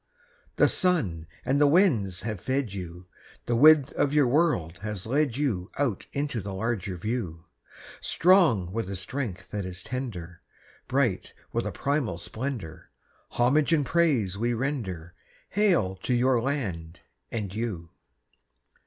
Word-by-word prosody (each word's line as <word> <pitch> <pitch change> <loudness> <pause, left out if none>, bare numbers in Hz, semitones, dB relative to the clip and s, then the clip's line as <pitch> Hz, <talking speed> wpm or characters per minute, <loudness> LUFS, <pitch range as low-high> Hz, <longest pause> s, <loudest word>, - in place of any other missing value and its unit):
The - - +5
sun 105 - +1 0.2
and 140 +2 +2
the 145 - +6
winds 130 - +3
have 105 -4 -4
fed 130 -4 -1
you; 90 -2 -7 0.4
The 120 - 0
width 150 +2 +6
of 145 - +1
your 145 -2 +5
world 120 - +1
has 105 -3 -5
led 135 +1 +1
you 110 -10 -1
Out 130 -9 -1
into 140 -5 -2
the 95 0 -6
larger 100 -3 -2
view; 90 -5 -4 0.5
Strong 165 - +4
with 110 -1 -3
a 100 - -4
strength 95 -1 -5
that 105 -1 -3
is 90 -1 -7
tender, 95 -10 -6 0.5
Bright 130 -8 0 0.2
with - - -1
a - - -3
primal 140 - -1
splendour, 105 - -6 0.4
Homage 140 +6 +2
and 150 -4 +2
praise 125 - +1
we 120 +1 0
render— 105 - -3 0.4
Hail 175 - +2
to 125 +6 -1
your 125 0 +3
land 95 - -3 0.3
and 105 -5 -3
you! 100 -7 -4
115 Hz, 140 wpm, -27 LUFS, 95-140 Hz, 0.5 s, the